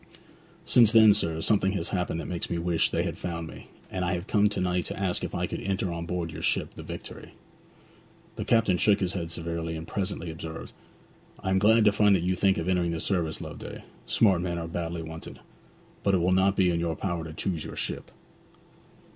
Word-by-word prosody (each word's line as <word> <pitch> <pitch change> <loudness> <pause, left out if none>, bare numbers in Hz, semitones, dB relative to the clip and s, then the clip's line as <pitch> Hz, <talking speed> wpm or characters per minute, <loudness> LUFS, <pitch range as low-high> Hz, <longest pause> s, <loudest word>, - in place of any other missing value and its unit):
'Since 115 -2 +5
then, 110 -2 +8
sir, 80 -5 -1
something 95 0 +2
has 85 -4 -2
happened 90 -3 -1
that 85 - -5
makes 85 -2 -3
me 85 - -1
wish 85 -1 +1
they - - 0
had - - -4
found 85 -2 -4
me, - - -11 0.2
and 90 - -2
I 90 +1 0
have 85 +1 -5
come 105 0 +3
to 105 - -3
night 90 -1 0
to - - -5
ask 95 -3 -1
if - - -4
I - - 0
could - - -5
enter 95 -1 -1
on 85 0 -5
board 85 -2 -2
your - - -7
ship - - 0
the - - -9
Victory.' - - -9 1.0
The - - -3
captain 115 -6 +3
shook 100 +4 +4
his 95 -1 -1
head 85 -3 -3
severely, 85 -1 -4
and 80 +1 -7
presently 95 -4 -3
observed: 80 0 -7 0.7
'I - - -1
am 95 - +3
glad 110 +2 +5
to 105 - +7
find 105 -1 +4
that 85 - 0
you 90 +1 +1
think 95 +1 +2
of 85 - -2
entering 90 -2 +2
the 80 - -3
service, 85 -5 -1
Loveday; - - -8 0.2
smart 95 -6 +4
men 85 -1 -2
are 85 -1 -4
badly 85 0 -4
wanted. 80 0 -8 0.6
But 100 -1 +2
it 90 - +2
will 90 +2 +2
not 95 +1 +3
be 90 -2 +3
in 85 - 0
your 85 -1 -1
power 85 -3 -2
to 80 - -7
choose 80 0 -3
your - - -7
ship.' - - -3
90 Hz, 220 wpm, -27 LUFS, 85-95 Hz, 1.0 s, then